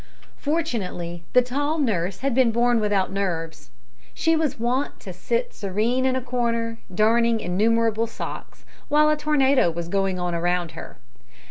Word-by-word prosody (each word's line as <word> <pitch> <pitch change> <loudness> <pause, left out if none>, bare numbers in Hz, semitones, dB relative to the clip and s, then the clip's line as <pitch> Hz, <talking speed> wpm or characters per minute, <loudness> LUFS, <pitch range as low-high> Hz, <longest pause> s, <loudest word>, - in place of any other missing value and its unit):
Fortunately, 195 - -3
the 250 - +6
tall 285 +5 -1
nurse 195 - -1
had 275 -1 0
been 250 -2 +4
born 240 +1 +2
without 205 -3 +1
nerves. 165 -7 -3 0.5
She 325 0 +2
was 315 -3 0
wont 250 +4 -1
to - - -8
sit 480 +1 -2
serene 225 +6 0
in 260 - +1
a 260 - -1
corner, 230 -2 -2
darning 230 +3 +3
innumerable 225 +4 +1
socks, 230 - -8 0.2
while 300 +1 +4
a - - +3
tornado 280 - +3
was 170 0 -5
going 195 0 0
on 180 -1 -2
around 175 0 0
her. - - -10
230 Hz, 150 wpm, -24 LUFS, 185-260 Hz, 0.5 s, the